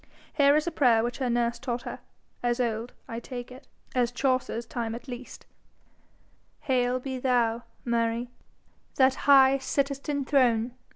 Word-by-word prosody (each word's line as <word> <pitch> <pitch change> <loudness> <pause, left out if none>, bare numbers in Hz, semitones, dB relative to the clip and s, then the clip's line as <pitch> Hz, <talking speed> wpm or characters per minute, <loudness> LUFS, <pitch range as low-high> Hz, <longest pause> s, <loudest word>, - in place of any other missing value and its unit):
Here 285 -1 +5
is 305 - +2
a 345 - -1
prayer 240 -7 +3
which 240 +3 -3
her 255 -2 0
nurse 235 0 0
taught 245 -2 -3
her, - - -6 0.4
as 240 0 0
old, 230 -1 -2
I 230 -3 -5
take 245 0 -8
it, 260 +3 -13 0.3
as 245 -2 +1
Chaucer's 255 -2 -1
time 230 -2 -4
at 240 - -10
least: 245 0 -9 1.2
Hail 255 -2 +1
be 260 0 -5
thou, 240 -2 +1 0.2
Mary, 235 0 0 0.6
that 260 -1 +5 0.2
high 270 -1 +7
sittest 275 +1 -2
in 285 -2 -1
throne! 245 -4 +2
250 Hz, 155 wpm, -27 LUFS, 235-270 Hz, 1.2 s, high